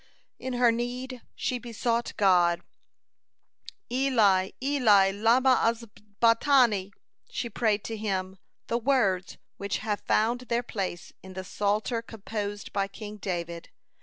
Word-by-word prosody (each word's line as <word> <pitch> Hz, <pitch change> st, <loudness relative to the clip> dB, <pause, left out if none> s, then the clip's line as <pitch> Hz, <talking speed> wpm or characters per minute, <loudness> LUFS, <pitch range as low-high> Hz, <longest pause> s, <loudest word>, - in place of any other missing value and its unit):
In 260 Hz, 0 st, -4 dB
her 245 Hz, -1 st, +4 dB
need, 245 Hz, +2 st, -4 dB
she 250 Hz, -, -2 dB
besought 235 Hz, 0 st, -2 dB
God: 175 Hz, -4 st, +4 dB, 1.3 s
"Eli, 220 Hz, -8 st, +3 dB
Eli, 225 Hz, -9 st, +4 dB
lamah 240 Hz, +6 st, +4 dB
azabtani," 230 Hz, 0 st, +2 dB, 0.5 s
and 235 Hz, -3 st, -7 dB
prayed 215 Hz, -3 st, +1 dB
to 225 Hz, -, -4 dB
Him 190 Hz, -3 st, -3 dB, 0.3 s
the 235 Hz, -, -1 dB
words 220 Hz, -8 st, +1 dB, 0.2 s
which 200 Hz, 0 st, -2 dB
have 210 Hz, -2 st, -3 dB
found 230 Hz, +3 st, +1 dB
their 235 Hz, 0 st, +1 dB
place 190 Hz, -6 st, -5 dB
in 190 Hz, 0 st, -11 dB
the 190 Hz, 0 st, -5 dB
Psalter 210 Hz, +4 st, -1 dB
composed 205 Hz, -2 st, -6 dB
by 195 Hz, -1 st, 0 dB
King 210 Hz, +1 st, -9 dB
David. 170 Hz, -4 st, -4 dB
215 Hz, 120 wpm, -27 LUFS, 195-240 Hz, 1.3 s, her